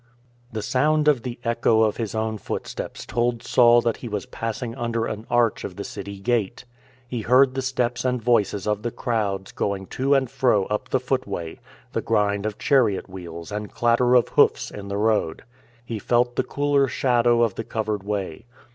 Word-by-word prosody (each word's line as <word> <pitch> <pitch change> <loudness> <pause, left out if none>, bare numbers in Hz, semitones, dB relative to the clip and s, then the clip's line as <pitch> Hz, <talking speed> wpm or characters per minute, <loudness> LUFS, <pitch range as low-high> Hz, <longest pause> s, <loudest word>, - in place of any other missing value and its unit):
The 110 -2 -4
sound 150 +3 +2
of 145 -5 +4
the 120 0 -5
echo 115 -2 +3
of 110 -2 +1
his 115 -2 -3
own 110 -1 -2
footsteps - - -5
told 120 -1 -1
Saul 120 -1 +5
that 115 -2 0
he 120 - -7
was 105 -2 -3
passing 115 +1 -4
under 115 -1 -2
an 110 0 -5
arch 120 -2 +2
of 90 - -6
the 100 - -5
city 100 -1 -7
gate. 115 +1 -1 0.4
He 120 -1 -3
heard 130 +3 +4
the 135 - -2
steps 125 -2 -1
and 125 -1 0
voices 105 -4 +1
of 105 -1 0
the 120 - -2
crowds 105 -5 -2
going 100 -1 -2
to 135 +2 +2
and 135 -1 +2
fro 115 -5 +2
up 105 +2 -3
the 130 - +2
footway; 110 -10 -3 0.3
the - - 0
grind 100 0 +1
of 105 - -5
chariot 115 -10 +2
wheels 85 -1 -8
and 105 0 -5
clatter 120 +1 +3
of 120 -3 +4
hoofs - - +3
in 100 -1 -8
the 100 0 -3
road. 105 -6 0 0.4
He 115 -2 -4
felt 120 +3 +1
the - - +1
cooler 145 -1 +1
shadow 120 -2 +2
of 115 -4 +1
the 115 - -5
covered 110 -2 -2
way. 100 -1 -4
115 Hz, 190 wpm, -24 LUFS, 105-125 Hz, 0.4 s, Saul